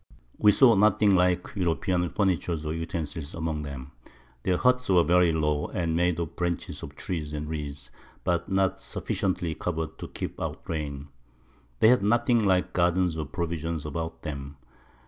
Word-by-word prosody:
We 105 - +7
saw 120 +3 +6
nothing 105 0 +4
like 90 0 +2
European 90 -1 0
Furniture 95 -3 0
or 75 - -2
Utensils 80 -2 -4
among 80 -2 -3
'em. 70 0 -8 0.5
Their 90 +6 +1
Huts 125 +1 +2
were 90 -3 +5
very 85 +1 +4
low, 75 -2 0
and 85 -2 -1
made 90 -1 +1
of 85 -2 -4
Branches 85 -1 -3
of 70 - -8
Trees 75 -2 -4
and 75 0 -4
Reeds, 70 -3 -6 0.3
but 85 -1 0
not 95 -1 +1
sufficiently 90 -3 -2
cover'd 80 -2 -4
to - - -6
keep - - -6
out - - -4
Rain. 75 -2 -4 0.7
They 110 - +7
had 125 -2 +5
nothing 120 +2 +3
like 95 -2 +2
Gardens 90 -1 +2
or 80 -1 -3
Provisions 85 -2 -3
about 80 +2 -5
them. 70 -2 -6
85 Hz, 160 wpm, -27 LUFS, 75-95 Hz, 0.7 s, We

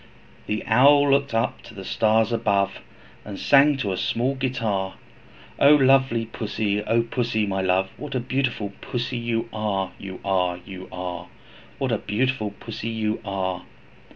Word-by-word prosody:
The 105 0 -2
Owl 140 +5 +5
looked 140 0 +2
up 115 - 0
to 120 -1 -13
the 95 -1 -8
stars 110 +2 +2
above, 100 -4 0 0.4
And 100 -2 -7
sang 140 +1 +5
to 105 -7 -2
a - - -3
small 120 +8 0
guitar, 115 -8 -2 0.6
'O 145 +2 +7
lovely 130 -4 +4
Pussy! 105 -2 -2
O 115 +1 +2
Pussy, 115 -2 -1
my 95 -1 -1
love, 95 +1 +1
What 145 -2 -6
a - - +2
beautiful 125 -5 -2
Pussy 120 +1 -3
you 115 -1 -2
are, 100 -3 -1
You 95 -2 -8
are, 90 -2 +1
You 95 -1 -9
are! 90 -1 -5 0.5
What 135 -2 -1
a 110 - +1
beautiful 110 +1 -1
Pussy 115 0 -5
you 110 -1 -2
are.' 95 -3 -3
110 Hz, 155 wpm, -24 LUFS, 100-130 Hz, 0.6 s, O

